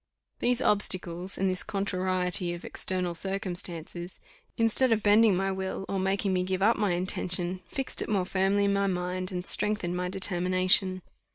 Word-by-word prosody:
These 250 +2 +1
obstacles, 185 -4 0
and 195 - +1
this 185 -1 0
contrariety 185 -2 -1
of 175 - -10
external 180 -2 -2
circumstances, 175 -1 -5 0.4
instead 230 +2 +2
of 220 -2 +2
bending 210 -1 +5
my 195 +1 0
will, 190 0 -4
or 195 - -2
making 195 +1 0
me 180 - +1
give 185 +1 -1
up 225 +3 +4
my 205 -4 0
intention, 180 0 -1
fixed 270 -3 0
it - - -3
more 195 -4 +1
firmly 195 +2 +1
in 200 - +2
my 200 0 +1
mind, 185 0 -3
and 180 -1 -4
strengthened 210 -5 +2
my 180 0 -2
determination. 185 0 +2
185 Hz, 165 wpm, -28 LUFS, 180-200 Hz, 0.4 s, bending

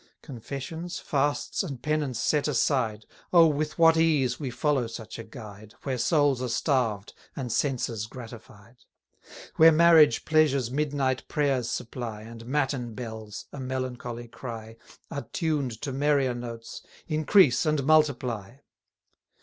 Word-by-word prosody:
Confessions, 140 +6 -6
fasts, 145 0 -1
and 145 -10 -5
penance 150 -3 -1
set 150 -1 +1
aside, 120 -6 0 0.3
Oh, 170 -2 +7
with 150 0 -1
what 165 -1 +6
ease 145 -7 +2
we 140 -4 -3
follow 135 -1 0
such 115 0 -8
a - - -5
guide, 110 -2 -11
Where 130 -3 -2
souls 145 -2 +2
are 130 - -1
starved, 115 -6 0 0.2
and 130 -4 -4
senses 120 -5 -1
gratified! 120 -2 -12 0.8
Where 165 +1 +8
marriage 160 -5 +6
pleasures 140 -6 +2
midnight 140 -2 -1
prayers 135 -6 0
supply, 115 -3 -5
And 115 +1 -11
matin 135 -4 -1
bells, 110 -3 -7
a 140 - -7
melancholy 125 -2 -4
cry, 115 -2 -8 0.4
Are 140 - -5
tuned 145 - -1
to 140 -3 -3
merrier 140 -2 +2
notes, 115 -2 -7 0.3
Increase 155 -3 +4
and 150 -2 +1
multiply. 130 -8 +2
130 Hz, 130 wpm, -27 LUFS, 115-150 Hz, 0.8 s, Where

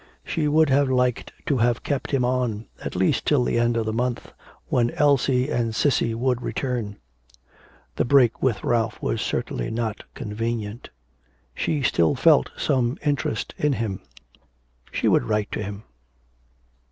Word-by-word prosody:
She 155 -2 -1
would 155 -1 +3
have 140 0 +3
liked 125 -2 0
to 140 - +1
have 120 0 +1
kept 140 -3 -2
him 135 -3 +1
on, 120 -4 -1 0.2
at - - -5
least 95 +1 +1
till 145 -4 +3
the 120 - +1
end 120 0 +2
of 115 - 0
the 110 - -2
month, 120 +1 -2 0.3
when 120 -1 +1
Elsie 135 -1 +2
and 115 -2 -1
Cissy 115 -3 +1
would 125 +1 0
return. 120 -6 -3 1.0
The - - +2
break 125 -3 +4
with 120 -6 0
Ralph 115 -2 0
was - - -2
certainly - - -2
not 110 -2 -3
convenient. 115 -1 -4 0.6
She 150 -3 -1
still 85 -9 +2
felt 65 - +4
some 130 0 +1
interest 140 -6 -1
in 150 -1 +2
him. 110 -6 -3 0.9
She - - 0
would - - +3
write 105 - -1
to - - -3
him. 105 +1 -6
120 Hz, 155 wpm, -24 LUFS, 110-130 Hz, 1.0 s, break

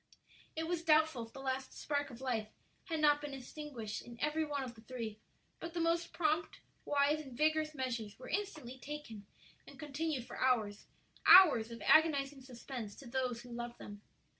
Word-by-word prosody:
It 320 0 -2
was 345 -1 -1
doubtful 310 -7 +3
if 225 - -22
the 270 - -8
last 265 0 -3
spark 285 -1 -1
of 245 -1 -11
life 235 -5 -1 0.4
had 325 -3 -2
not 295 -1 +5
been 290 -2 -5
extinguished 255 -5 -6
in 235 -1 -12
every 300 +3 +1
one 290 -3 -2
of 250 -2 -6
the 220 - -15
three; 225 -2 -6 0.4
but 335 +1 -7
the - - 0
most 335 +1 +1
prompt, 315 0 0 0.3
wise, 290 +1 +2
and 265 -5 -10
vigorous 310 +1 +2
measures 235 -6 -3
were 255 - -10
instantly 310 -10 -4
taken 255 -8 -8 0.4
and - - -12
continued 295 -3 -3
for - - -9
hours 220 -6 +1 0.4
hours 290 -12 +9
of 230 0 -8
agonizing 285 -3 +4
suspense 245 -4 -7
to 275 - -12
those 245 -1 -1
who 245 - -12
loved 240 0 -5
them. 205 0 -10
270 Hz, 180 wpm, -35 LUFS, 240-310 Hz, 0.4 s, hours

